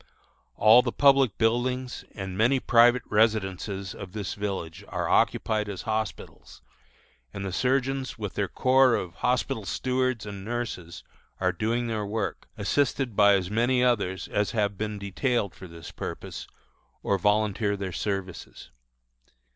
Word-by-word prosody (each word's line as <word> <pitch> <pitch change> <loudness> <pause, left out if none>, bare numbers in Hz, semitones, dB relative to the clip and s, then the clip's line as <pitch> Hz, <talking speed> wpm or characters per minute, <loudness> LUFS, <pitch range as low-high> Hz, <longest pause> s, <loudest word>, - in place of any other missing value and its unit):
All 110 +7 +7
the 120 -1 -2
public 135 -6 +4
buildings 125 +2 0
and 95 -2 -5
many 120 +7 +3
private 120 0 +5
residences 100 -3 0
of 95 -2 -9
this 105 -3 -4
village 95 -6 -5
are - - -3
occupied 105 -1 +1
as 95 -3 -6
hospitals, 110 - -5 0.7
and 100 - -6
the 95 - -3
surgeons 135 +3 0
with 105 -3 -5
their 100 - -1
corps 130 +3 +4
of 90 -2 -4
hospital 125 -3 0
stewards 130 +1 -1
and 100 -2 -7
nurses 105 -7 -5 0.4
are 90 -1 +2
doing 115 +6 -1
their 110 -2 -2
work, 105 0 -3
assisted 125 +2 0
by 100 0 +6
as 95 -1 -2
many 125 +3 +2
others 100 -7 0
as 105 0 0
have 105 -3 0
been 105 +1 -4
detailed 100 +2 -1
for 90 - -11
this 85 -3 -10
purpose, - - -7 0.6
or 100 - +1
volunteer 105 +1 +1
their 95 -1 -4
services. 95 -3 -5
105 Hz, 140 wpm, -26 LUFS, 100-120 Hz, 0.7 s, All